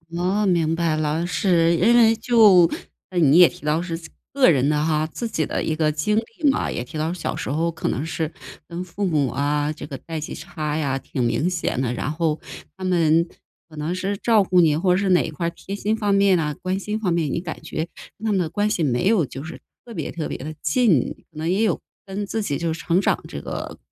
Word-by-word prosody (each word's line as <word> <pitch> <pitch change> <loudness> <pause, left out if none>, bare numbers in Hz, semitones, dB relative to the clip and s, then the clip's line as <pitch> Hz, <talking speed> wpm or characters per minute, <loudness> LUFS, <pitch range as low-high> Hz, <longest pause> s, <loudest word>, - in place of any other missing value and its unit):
哦， 185 +4 +1
明 170 -4 +2
白 165 -1 +1
了， 155 +2 -1
是。 170 -1 +2
因 210 +8 +4
为 225 -1 +6
就 215 -7 +6 0.4
你 165 -3 +4
也 180 - +9
提 - - -13
到 155 +2 +1
是 165 -2 -4 0.3
个 275 -5 +5
人 140 -3 +3
的 150 0 +1
哈， 155 -1 +1
自 200 +9 -5
己 160 -8 -1
的 - - -2
一 155 - -1
个 155 -1 +2
经 155 +8 0
历 230 +7 0
嘛， 270 - 0
也 - - -3
提 140 +6 -7
到 155 +2 -1
小 180 - -3
时 - - -4
候 165 +3 0
可 165 -1 -3
能 140 - -2
是 160 0 -3 0.4
跟 170 +1 -5
父 190 +3 -3
母 150 -6 +1
啊， 145 +3 0
这 155 - -8
个 140 -2 -7
代 165 +4 -7
际 150 - -5
差 150 -1 -4
呀， 140 -4 0
挺 135 -1 -5
明 125 +8 +1
显 165 -7 -1
的， 120 -2 -1
然 125 - -3
后 155 0 -1 0.4
他 190 - -5
们 170 -2 +3 0.4
可 155 - -14
能 155 +3 -2
是 190 +2 -2
照 220 +1 +3
顾 180 -1 +4
你， 155 -3 +3
或 180 +2 +2
者 - - +2
是 195 0 0
哪 180 -1 +5
一 - - -3
块 170 - -3
儿 - - +1
贴 190 +3 -7
心 210 +2 0
方 205 -2 +1
面 195 -2 +4
啊、 150 -2 -1
关 185 +1 -1
心 210 +2 -3
方 205 -5 -1
面， 165 -3 0
你 165 - -2
感 165 -3 -7
觉 160 +1 -4 0.3
跟 220 - -8
他 220 - +1
们 195 - +2
的 170 -3 -1
关 205 +5 0
系 195 -5 -1
没 135 +5 +1
有 200 -7 +3
就 135 +2 -8
是 160 - -8 0.3
特 235 - -10
别 - - -4
特 160 -2 -4
别 - - -4
地 155 +3 -7
近， 155 - +2 0.2
可 155 - -17
能 160 +2 -2
也 195 +5 +2
有 205 -7 +1 0.2
跟 200 +1 -4
自 220 +2 -2
己 145 -9 -2
就 165 -1 -1
是 165 - -7
成 175 +3 +1
长 - - +1
这 - - -7
个 - - -6
170 Hz, 265 characters per minute, -22 LUFS, 155-195 Hz, 0.4 s, 也